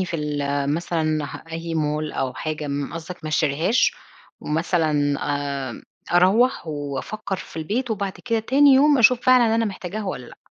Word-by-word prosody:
في 175 -2 -4
ال 150 -1 -2 0.3
مثلًا 160 -2 -1 0.3
أي 165 0 -4
مول 150 0 -1
أو 130 -1 -2
حاجة 155 -1 -4
م 140 +1 -3
قصدك 165 0 -8
ما - - -3
أشتريهاش 155 - +2 0.5
ومثلًا 155 -3 0
آآ، 140 -3 -3 0.3
أروَّح 195 +5 +3
وأفكر 155 +8 -4
في 175 - -11
البيت 225 +10 -2
وبعد 200 -3 -2
كده 230 -2 +1
تاني 275 +5 +4
يوم 285 0 +5
أشوف 240 +1 +5
فعلًا 245 -3 +4
أنا 230 0 +2
محتاجاها 205 +1 -5
والّا 125 -11 -5
لأ؟ - - -15
165 Hz, 155 wpm, -23 LUFS, 150-215 Hz, 0.5 s, يوم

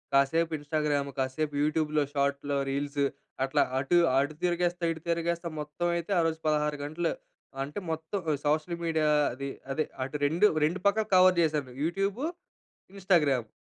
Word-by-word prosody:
కాసేపు 160 +5 +3
ఇన్స్టాగ్రామ్, 145 -1 -1
కాసేపు 140 +3 -1
యూట్యూబ్‌లో 155 0 +1
షార్ట్స్‌లో, 140 0 0
రీల్స్ 140 +1 -1 0.4
అట్లా. 135 - +2 0.2
అటు, 140 +6 +2 0.2
అటు 140 +3 +1
తిరిగేస్తా, 175 0 0
ఇటు 160 -1 -6
తిరిగేస్తా, 170 0 -1
మొత్తం 150 +4 -3
అయితే 170 +3 -5
ఆరోజు 165 -1 0
16 150 -1 +1
గంటలు. 160 +3 -1 0.5
అంటే 145 +8 -5
మొత్తం 160 +5 -3 0.3
సోషల్ 155 +3 0
మీడియా 160 -2 +1 0.3
అది. 140 +2 -5 0.2
అదే 155 +3 +1 0.2
అటు 135 - -8
2 170 +7 +3 0.2
2 170 +5 -1
పక్కల 215 +2 +2
కవర్ 185 0 +7
చేసాను. 150 -5 0
YouTube, 195 +7 -1 0.7
Instagram. 150 - +2
155 Hz, 135 wpm, -29 LUFS, 145-170 Hz, 0.7 s, కవర్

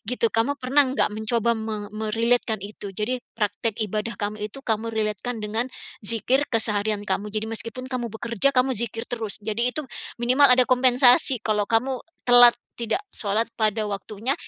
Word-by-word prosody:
gitu 240 -2 +1
kamu 240 +6 +1
pernah 270 +2 +2
gak - - +2
mencoba 225 +2 +1
me 220 -2 -5
me-relate-kan 220 +1 0
itu 205 -1 -8
jadi 245 +5 -2 0.2
praktek 210 +1 -2
ibadah 215 +3 -4
kamu 210 0 -4
itu 215 - -10
kamu 225 0 -1
relate-kan 220 +2 -2
dengan 225 +4 -2 0.3
dzikir 235 +6 +1
keseharian 210 -2 0
kamu 205 +1 -2
jadi 215 0 -2
meskipun 230 +3 -3
kamu 240 -2 -2
bekerja 235 +4 0
kamu 260 +1 +3
dzikir 230 -1 -3
terus 225 -5 -3
jadi 225 +3 0
itu 305 +1 -4 0.4
minimal 255 +4 +5
ada 250 0 +4
kompensasi 255 +1 +5
kalau 210 -2 0
kamu 250 +3 0 0.2
telat, 245 -1 +8 0.2
tidak 235 - 0
shalat 215 +2 -1
pada 215 0 0
waktunya 205 +5 -3
225 Hz, 160 wpm, -23 LUFS, 215-245 Hz, 0.4 s, telat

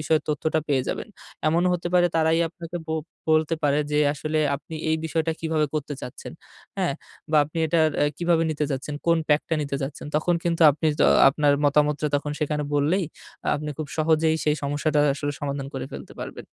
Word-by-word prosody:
বিষয়ে 155 0 +2
তথ্যটা 155 +1 0
পেয়ে 135 -3 +2
যাবেন। - - -4 0.4
এমনও 170 +3 +2
হতে 175 0 -3
পারে 175 -1 +5
তারাই 160 0 +3
আপনাকে 170 +1 -8
বো 160 - -2 0.4
বলতে 155 +1 +3
পারে, 145 0 +3
যে 150 - +1 0.2
আসলে 155 +2 -2 0.2
আপনি 160 +3 -11 0.2
এই 160 - +3
বিষয়টা 160 0 0
কিভাবে 160 -2 +1
করতে 150 -1 -2
চাচ্ছেন? 125 - -8 0.4
হ্যাঁ? - - 0 0.4
বা 155 - +3
আপনি 155 +3 -7
এটা 165 +1 +2 0.2
আ - - +5
কিভাবে 170 -1 +2
নিতে 150 -1 -1
চাচ্ছেন, 135 +2 -3
কোন 170 0 +4
pack 150 0 +4
টা 165 - +1
নিতে 140 -1 -3
চাচ্ছেন? 135 +2 -5
তখন 175 +3 +1
কিন্তু 170 -1 +1
আপনি 155 +3 -2
তো - - +6 0.2
আপনার 145 +1 +2
মতামতটা 150 +1 +2
তখন 145 +1 -3
সেখানে 150 0 0
বললেই, 155 +7 +2 0.5
আপনি 150 +1 -4
খুব 155 - -3
সহজেই 160 0 +3
সেই 150 0 +2
সমস্যাটা 145 +2 +1
আসলে 145 +1 -3
সমাধান 140 -1 -3
করে 130 -1 -3
ফেলতে - - -8
পারবেন। - - -7
155 Hz, 190 wpm, -24 LUFS, 145-160 Hz, 0.5 s, তো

